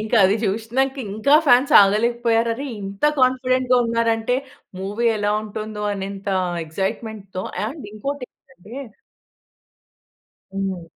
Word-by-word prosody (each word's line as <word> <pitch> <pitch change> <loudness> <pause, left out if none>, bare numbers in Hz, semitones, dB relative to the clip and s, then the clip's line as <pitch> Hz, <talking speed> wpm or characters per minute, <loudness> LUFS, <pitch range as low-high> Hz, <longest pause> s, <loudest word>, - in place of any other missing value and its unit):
ఇంకా 220 +2 0
అది 195 +3 +4
చూసినాక 235 +7 -1 0.2
ఇంకా 250 +8 +3
ఫాన్స్ 250 +2 +5
ఆగలేకపోయారు. 230 +3 +2
"అరే 275 +4 -5 0.2
ఇంత 195 +3 -8 0.2
కాన్ఫిడెంట్‌గా 255 0 +2
ఉన్నారంటే 230 +1 +1 0.4
మూవీ 205 +5 -2
ఎలా 205 0 +1
ఉంటుందో 215 0 -6
అనేంత 195 0 -6 0.4
ఎక్సైట్మెంట్‌తో." 195 +2 -4 0.2
అండ్ 275 +2 -7
ఇంకోటి 275 +5 -4
ఏంటంటే 235 -5 -19 1.8
హ్మ్. 190 -3 -3
225 Hz, 105 wpm, -21 LUFS, 200-250 Hz, 1.8 s, ఫాన్స్